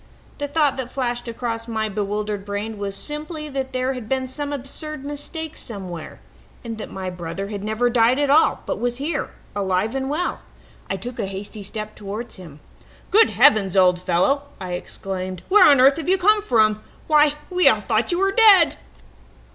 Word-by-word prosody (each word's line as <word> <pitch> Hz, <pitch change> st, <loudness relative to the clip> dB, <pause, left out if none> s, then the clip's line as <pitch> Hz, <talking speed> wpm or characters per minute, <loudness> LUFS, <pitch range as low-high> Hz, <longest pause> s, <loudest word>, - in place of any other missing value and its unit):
The 290 Hz, -, -2 dB
thought 290 Hz, -2 st, +1 dB
that 250 Hz, -2 st, -5 dB
flashed 245 Hz, -2 st, -2 dB
across 230 Hz, -1 st, -4 dB
my 220 Hz, -1 st, -1 dB
bewildered 210 Hz, 0 st, -3 dB
brain 205 Hz, +1 st, -4 dB
was 200 Hz, -1 st, -3 dB
simply 305 Hz, -, -5 dB
that 270 Hz, -1 st, -4 dB
there 255 Hz, +1 st, -1 dB
had 245 Hz, -4 st, -8 dB
been 265 Hz, -1 st, 0 dB
some 285 Hz, +3 st, -5 dB
absurd 285 Hz, +1 st, -6 dB
mistake 305 Hz, +2 st, -5 dB
somewhere, 185 Hz, -7 st, -7 dB, 0.4 s
and 225 Hz, -2 st, -6 dB
that -, -, -6 dB
my 190 Hz, -1 st, -5 dB
brother 180 Hz, +3 st, -5 dB
had 205 Hz, -2 st, -5 dB
never 220 Hz, +3 st, 0 dB
died 240 Hz, +1 st, +3 dB
at 285 Hz, -1 st, +2 dB
all, 310 Hz, +3 st, +4 dB
but -, -, -3 dB
was 240 Hz, 0 st, -1 dB
here, 295 Hz, +5 st, -2 dB, 0.3 s
alive 195 Hz, +2 st, 0 dB
and 270 Hz, 0 st, -2 dB
well. 330 Hz, +5 st, -2 dB, 0.5 s
I -, -, -1 dB
took 240 Hz, +6 st, -7 dB
a -, -, -1 dB
hasty 200 Hz, +2 st, -6 dB
step 215 Hz, +2 st, -6 dB
towards 210 Hz, +3 st, -7 dB
him. 155 Hz, -5 st, -12 dB, 0.5 s
"'Good 445 Hz, +3 st, +6 dB
heavens, 195 Hz, -3 st, +4 dB
old 180 Hz, -1 st, +5 dB
fellow!' 185 Hz, +11 st, +1 dB
I 185 Hz, -1 st, -6 dB
exclaimed. 185 Hz, 0 st, -5 dB
'Where 410 Hz, -4 st, +7 dB
on 280 Hz, -3 st, +6 dB
earth 270 Hz, +3 st, +6 dB
have 325 Hz, +1 st, -3 dB
you 380 Hz, -, +4 dB
come 420 Hz, +3 st, +4 dB
from? 215 Hz, -, +2 dB, 0.2 s
Why, 300 Hz, -1 st, +4 dB, 0.2 s
we 365 Hz, 0 st, +3 dB
all 215 Hz, -1 st, +2 dB
thought 220 Hz, +5 st, 0 dB
you 345 Hz, -, +1 dB
were 390 Hz, +1 st, +2 dB
dead!' 400 Hz, -5 st, +6 dB
235 Hz, 185 wpm, -22 LUFS, 200-290 Hz, 0.5 s, Where